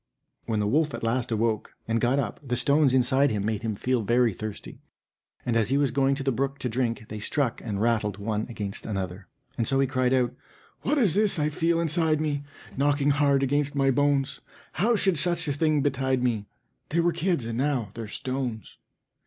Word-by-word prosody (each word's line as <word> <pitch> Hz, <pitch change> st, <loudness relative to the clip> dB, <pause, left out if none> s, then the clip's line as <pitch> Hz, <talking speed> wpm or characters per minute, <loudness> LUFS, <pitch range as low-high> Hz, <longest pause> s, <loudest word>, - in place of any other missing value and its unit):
When 110 Hz, -2 st, 0 dB
the 105 Hz, -, +1 dB
wolf 150 Hz, +7 st, +1 dB
at -, -, -8 dB
last 120 Hz, +2 st, 0 dB
awoke, 110 Hz, -1 st, -1 dB
and 115 Hz, 0 st, 0 dB
got 125 Hz, +3 st, +2 dB
up, 120 Hz, -7 st, -2 dB
the 125 Hz, -3 st, -2 dB
stones 140 Hz, +2 st, +3 dB
inside 130 Hz, +2 st, +4 dB
him 105 Hz, -3 st, -2 dB
made 110 Hz, -1 st, -1 dB
him 110 Hz, -2 st, -2 dB
feel 125 Hz, +3 st, 0 dB
very 120 Hz, +1 st, +2 dB
thirsty, 110 Hz, +2 st, -7 dB, 0.6 s
and 120 Hz, -, 0 dB
as 115 Hz, -1 st, +2 dB
he 135 Hz, -, +2 dB
was 140 Hz, -3 st, +2 dB
going 135 Hz, +1 st, +2 dB
to 135 Hz, -, -5 dB
the 135 Hz, -, +1 dB
brook 135 Hz, +3 st, -1 dB
to 130 Hz, -2 st, -3 dB
drink, 115 Hz, -2 st, -1 dB
they 105 Hz, -, -5 dB
struck 125 Hz, +3 st, -1 dB
and 105 Hz, -4 st, -3 dB
rattled 110 Hz, -3 st, +1 dB
one 105 Hz, +1 st, -2 dB
against 105 Hz, -4 st, -5 dB
another. 95 Hz, -2 st, -4 dB, 0.3 s
And 115 Hz, -, +1 dB
so 135 Hz, -, +2 dB
he 135 Hz, -, +4 dB
cried 130 Hz, -1 st, 0 dB
out: 125 Hz, -2 st, +2 dB, 0.5 s
"What 295 Hz, +3 st, 0 dB
is 215 Hz, -, +3 dB
this 210 Hz, -2 st, +2 dB
I 150 Hz, -1 st, +1 dB
feel 165 Hz, +2 st, +1 dB
inside 160 Hz, -1 st, +1 dB
me 145 Hz, -2 st, -1 dB, 0.3 s
Knocking 145 Hz, +1 st, +2 dB
hard 140 Hz, -1 st, +3 dB
against 145 Hz, +1 st, 0 dB
my 135 Hz, -1 st, +3 dB
bones? 140 Hz, 0 st, +1 dB, 0.3 s
How 230 Hz, +7 st, +2 dB
should 190 Hz, -6 st, +2 dB
such 170 Hz, +1 st, +1 dB
a 145 Hz, -, +1 dB
thing 155 Hz, 0 st, +2 dB
betide 130 Hz, -2 st, 0 dB
me! 110 Hz, -5 st, 0 dB, 0.4 s
They 165 Hz, -, 0 dB
were 170 Hz, +1 st, +3 dB
kids, 170 Hz, -8 st, 0 dB
and 115 Hz, +1 st, -3 dB
now 135 Hz, -6 st, 0 dB
they're 115 Hz, -1 st, -6 dB
stones." 130 Hz, -2 st, -4 dB
130 Hz, 205 wpm, -26 LUFS, 115-145 Hz, 0.6 s, inside